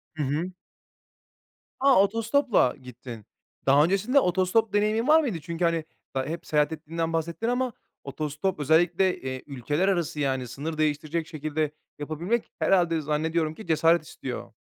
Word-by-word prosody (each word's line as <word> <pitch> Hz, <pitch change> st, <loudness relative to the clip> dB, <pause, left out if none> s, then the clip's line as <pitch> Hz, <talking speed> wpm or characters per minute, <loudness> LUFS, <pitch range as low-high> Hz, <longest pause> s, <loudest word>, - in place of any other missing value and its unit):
Hı 155 Hz, -, -2 dB
hı. 155 Hz, +7 st, -1 dB, 1.3 s
A! 270 Hz, 0 st, +5 dB
Otostopla 230 Hz, -, +2 dB
gittin. 120 Hz, -3 st, -10 dB, 0.4 s
Daha 140 Hz, +2 st, +6 dB
öncesinde 200 Hz, -, +3 dB
otostop 190 Hz, +3 st, +1 dB
deneyimin 215 Hz, +3 st, +1 dB
var 315 Hz, +1 st, +6 dB
mıydı? 220 Hz, -, -2 dB
Çünkü 170 Hz, +2 st, -2 dB
hani 165 Hz, -2 st, 0 dB, 0.3 s
ba 130 Hz, 0 st, 0 dB
hep 160 Hz, +4 st, -5 dB
seyahat 150 Hz, 0 st, +2 dB
ettiğinden 165 Hz, +1 st, -3 dB
bahsettin 165 Hz, +7 st, -2 dB
ama 245 Hz, 0 st, 0 dB, 0.3 s
otostop 150 Hz, +5 st, -3 dB
özellikle, 175 Hz, +5 st, +3 dB
eee, 130 Hz, 0 st, -5 dB
ülkeler 145 Hz, +6 st, -1 dB
arası 170 Hz, -6 st, 0 dB
yani 130 Hz, -3 st, -1 dB
sınır 150 Hz, +6 st, -5 dB
değiştirecek 155 Hz, +2 st, -1 dB
şekilde 155 Hz, -1 st, -2 dB, 0.3 s
yapabilmek 170 Hz, +10 st, -2 dB
herhâlde 175 Hz, -4 st, +2 dB
zannediyorum 155 Hz, +2 st, 0 dB
ki 220 Hz, -, -11 dB
cesaret 165 Hz, +1 st, +3 dB
istiyor. -, -, -7 dB
165 Hz, 140 wpm, -26 LUFS, 150-190 Hz, 1.3 s, Daha